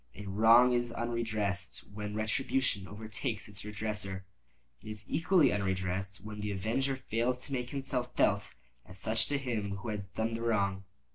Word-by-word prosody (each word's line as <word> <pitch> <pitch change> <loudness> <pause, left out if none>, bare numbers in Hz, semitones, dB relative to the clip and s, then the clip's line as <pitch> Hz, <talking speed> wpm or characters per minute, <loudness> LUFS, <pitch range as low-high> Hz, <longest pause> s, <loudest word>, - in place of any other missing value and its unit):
A 100 - -8
wrong 115 +5 +6
is 120 -1 +1
unredressed 110 -5 -1
when 105 0 -4
retribution 110 -1 +1
overtakes 110 +2 -4
its 100 -1 -9
redresser. 105 -2 -3 0.6
It 110 - -9
is 105 -1 -6
equally 165 -3 +4
unredressed 95 0 -1
when 105 -1 -6
the 105 0 -2
avenger 115 +8 0
fails 125 -1 0
to 140 - -6
make 125 -2 -1
himself 135 -3 -1
felt 100 0 +3 0.3
as 90 - -10
such 110 +3 +1
to 145 - +1
him 110 -7 -2
who 100 +4 -5
has 100 -2 -3
done 110 +4 -2
the 115 - -3
wrong. 100 -4 +1
110 Hz, 160 wpm, -32 LUFS, 100-120 Hz, 0.6 s, wrong